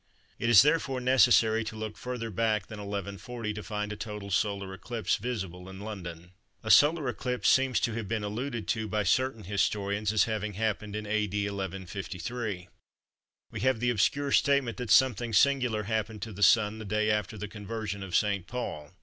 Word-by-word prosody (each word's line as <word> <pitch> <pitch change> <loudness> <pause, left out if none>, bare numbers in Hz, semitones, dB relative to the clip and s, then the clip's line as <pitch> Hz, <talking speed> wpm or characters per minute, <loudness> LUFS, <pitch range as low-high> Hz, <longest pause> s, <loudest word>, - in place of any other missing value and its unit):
It 115 - 0
is 115 -2 +9
therefore 145 -3 +1
necessary 120 -3 +4
to 110 - -6
look 110 -1 -5
further 125 -3 -5
back 110 0 0
than 110 - -9
1140 100 +3 -5
to 105 - -6
find 105 +2 -4
a - - -6
total 105 -2 -6
solar 100 -1 -1
eclipse 110 0 -2
visible 95 -6 -5
in 95 0 -9
London. 90 -5 -7 0.3
A 110 - +1
solar 150 -1 +5
eclipse 125 -1 -2
seems 130 -2 +3
to 115 - 0
have 110 -2 -4
been 110 0 -2
alluded 115 +3 -4
to 110 -1 0
by 105 0 0
certain 115 +3 +1
historians 100 +1 0
as 110 - +4
having 105 -2 -2
happened 105 0 -2
in 105 0 -4
A.D. 105 -1 -1
1153. 95 +1 -5 0.8
We - - -5
have 130 -3 +2
the 120 +1 +2
obscure 140 +6 +1
statement 140 -5 +2
that 125 -3 -5
"something 120 +1 +4
singular 125 -2 +3
happened 110 -1 -2
to 115 - -6
the 100 - -9
Sun 105 +1 +4
the 110 - -7
day 105 +1 +1
after 105 +1 -1
the 105 +1 -5
Conversion 105 -1 -5
of 95 -2 -4
St. 100 -3 +1
Paul." 85 -10 -5
105 Hz, 180 wpm, -29 LUFS, 100-120 Hz, 0.8 s, is